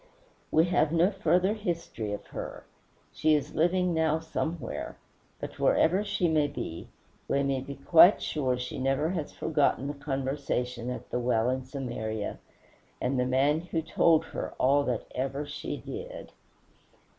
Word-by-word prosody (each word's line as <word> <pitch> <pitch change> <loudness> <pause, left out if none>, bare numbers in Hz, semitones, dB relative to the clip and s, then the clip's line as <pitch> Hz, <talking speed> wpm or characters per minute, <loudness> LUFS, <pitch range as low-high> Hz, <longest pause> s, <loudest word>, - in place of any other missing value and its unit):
We 160 +1 +4
have 175 -3 +2
no 170 +4 +4
further 190 0 +2
history 170 - -3
of 105 - -5
her. - - -6 0.5
She 155 -1 +3
is 145 - -2
living 180 +2 +2
now 160 -1 +2
somewhere; 160 -3 -4 0.4
but - - -7
wherever 185 +5 +3
she 200 -4 0
may 155 -2 +3
be, 85 - -6 0.4
we 140 0 +1
may 135 -1 0
be 140 +1 -7
quite 170 +7 +7
sure 130 -5 -1
she 125 +1 -5
never 135 +4 +1
has 165 -6 -3
forgotten 145 -4 +1
the 145 - -2
conversation 135 -3 -2
at 125 - -6
the 125 - 0
well 120 0 +2
in 130 0 -3
Samaria, 120 -5 -4 0.6
and 130 +1 0
the 125 - +1
man 140 +4 +3
who 165 -2 -3
"told 160 0 +3
her - - -5
all 140 +2 +4
that 120 -3 -1
ever 135 +3 -2
she 145 - -5
did." - - -8
145 Hz, 155 wpm, -29 LUFS, 130-165 Hz, 0.6 s, quite